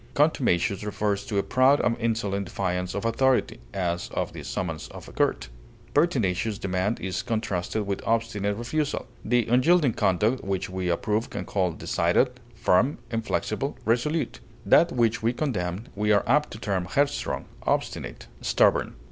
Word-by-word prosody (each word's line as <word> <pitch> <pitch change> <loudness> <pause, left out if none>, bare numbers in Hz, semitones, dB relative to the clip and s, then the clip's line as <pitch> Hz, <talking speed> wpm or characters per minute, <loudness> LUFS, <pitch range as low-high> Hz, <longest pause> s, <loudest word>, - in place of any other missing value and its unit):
Contumacious 115 - +2
refers 105 -1 -1
to 105 -5 -2
a 100 - +2
proud 130 +3 +4
and 115 - +2
insolent 105 -4 -1
defiance 90 -2 -2
of 100 - -3
authority, 130 +3 +2
as 90 -2 -2
of - - -2
the - - -7
summons 80 -4 -4
of - - -11
a - - -10
court. - - 0 0.4
Pertinacious 110 - +1
demand 95 +1 -1
is 95 0 -2
contrasted 110 -2 -2
with 100 -1 -2
obstinate 110 -3 0
refusal. 145 +6 -2 0.2
The 120 0 +2
unyielding 130 +3 +4
conduct 105 +9 +1
which 95 -1 -2
we 95 -1 -2
approve 105 +6 0
we - - -4
call 90 -4 0
decided, 85 +10 +1 0.2
firm, 115 +6 +2
inflexible, 115 -1 -2
resolute; 125 +9 0 0.3
that 170 - +5
which 120 -2 +1
we 115 +2 +1
condemn 100 - -2
we 105 +1 +1
are 100 -1 +4
apt 150 +5 +3
to - - -7
term 95 -5 -1
headstrong, 140 +9 0 0.2
obstinate, 60 - -2 0.2
stubborn. - - +2
105 Hz, 150 wpm, -26 LUFS, 95-120 Hz, 0.4 s, that